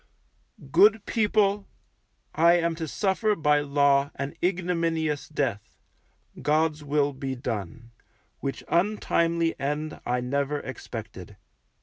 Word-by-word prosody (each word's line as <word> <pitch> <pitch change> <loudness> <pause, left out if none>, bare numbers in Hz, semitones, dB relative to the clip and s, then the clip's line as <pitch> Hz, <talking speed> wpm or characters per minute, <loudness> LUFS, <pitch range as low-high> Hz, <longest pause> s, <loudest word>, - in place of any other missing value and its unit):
Good 205 +5 +5
people, 205 -2 +1 0.7
I 170 +2 +5
am 170 -1 +2
to 165 -1 -5
suffer 210 +5 0
by 150 -4 +3
Law 140 -1 +2
an 140 +1 -4
ignominious 165 -4 0
death 130 -9 -3 0.6
(God's 155 0 +1
will 145 0 +1
be 135 0 -4
done) 115 -2 -5 0.5
which 135 -1 -4
untimely 170 -3 +1
end 150 +3 -3
I 125 +1 0
never 140 +3 -1
expected. 110 -7 -8
150 Hz, 105 wpm, -26 LUFS, 140-170 Hz, 0.7 s, Good